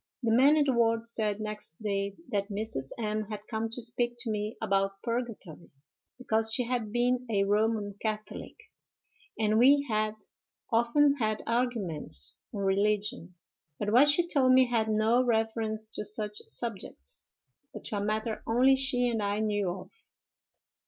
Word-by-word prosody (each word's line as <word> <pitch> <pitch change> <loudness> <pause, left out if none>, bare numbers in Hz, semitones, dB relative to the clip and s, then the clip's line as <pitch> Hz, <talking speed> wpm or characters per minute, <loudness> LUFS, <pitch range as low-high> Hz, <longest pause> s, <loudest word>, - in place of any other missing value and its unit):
"'The 230 - +1
men 280 +5 +5
in 300 - +4
the 275 -2 +1
ward 230 -1 +2
said, 220 -3 -2
next 210 -6 -6
day, 200 -2 -2
that 200 -1 -1
Mrs. 200 -10 -4
M—— 215 -2 -2
had 210 -1 -7
come 225 0 -3
to 230 - -7
speak 240 0 -1
to 240 -2 -3
me 210 +1 -3
about 195 -2 0
purgatory, 230 -9 -5 0.5
because 225 -3 +1
she 250 - +1
had 235 -3 -2
been 250 +2 0
a 200 -3 +2
Roman 210 0 0
catholic, 215 -1 -5 0.8
and 215 0 +2
we 280 +3 +5
had 215 -1 0 0.6
often 280 +5 +3
had 215 -4 -1
arguments 205 - -1 0.2
on 205 - -5
religion: 200 0 0 0.4
but 205 0 -2
what 265 +5 +7
she 335 +4 +3
told 265 -6 +4
me 260 0 +6
had 230 -3 0
no 220 +3 +3
reference 220 -2 -1
to 215 - -3
such 210 0 +1
subjects, 195 - -2 0.4
but - - -9
to 215 - -3
a 200 - -2
matter 215 +1 -2
only 255 +4 +4
she 265 -2 +1
and 230 -3 -1
I 205 0 -1
knew 205 -3 0
of. 180 +1 -7
220 Hz, 160 wpm, -29 LUFS, 210-240 Hz, 0.8 s, what